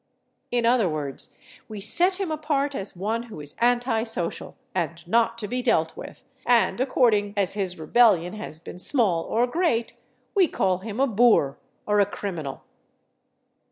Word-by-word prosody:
In 240 -1 0
other 235 -5 +3
words, 145 -3 -4 0.4
we 215 -1 -7
set 360 - +1
him 380 -5 -2
apart 295 -2 -1
as 195 -7 -5
one 215 +6 -2
who 210 - -9
is 145 -1 -8
anti 240 -1 +2
social 220 -7 -2 0.2
and 170 -1 -3
not 230 +4 +2
to 215 -3 -4
be 250 +4 -2
dealt 165 -10 +1
with, - - -10 0.2
and 240 0 +2
according 220 -6 +2
as 195 -3 +1
his 190 -3 -2
rebellion 180 +1 +3
has 210 -7 -8
been 175 - -10
small 195 - +2
or 235 +2 +1
great, 245 -4 0 0.4
we 385 -4 +4
call 185 - 0
him 215 +3 -6
a 275 - +4
boor 220 - +3 0.3
or 210 0 +2
a 200 - +4
criminal. 170 -10 -5
220 Hz, 160 wpm, -25 LUFS, 180-245 Hz, 0.4 s, we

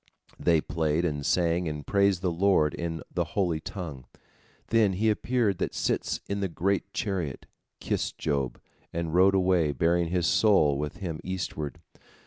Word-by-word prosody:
They 85 -3 +3
played 80 +1 0
and 75 -4 -2
sang 85 +2 +1
and 75 -2 -5
praised 100 -2 +2
the 90 - +1
Lord 85 -4 +3
in 80 -3 -4
the - - +1
holy 90 -5 +1
tongue. 80 -8 -7 0.6
Then 110 -4 +3
he 110 +4 +2
appeared 110 -3 0
that - - -2
sits - - -1
in 100 0 -2
the 100 - 0
great 95 +3 -1
chariot, 90 -12 -3 0.3
kissed - - -2
Job, 70 -5 -1 0.3
and 85 -1 -3
rode 95 +2 +5
away 90 -5 +2
bearing 85 +5 +2
his 90 0 0
soul 80 -8 +4
with 75 0 -4
him 85 -5 -4
eastward. 90 -6 -4
85 Hz, 155 wpm, -27 LUFS, 80-95 Hz, 0.6 s, rode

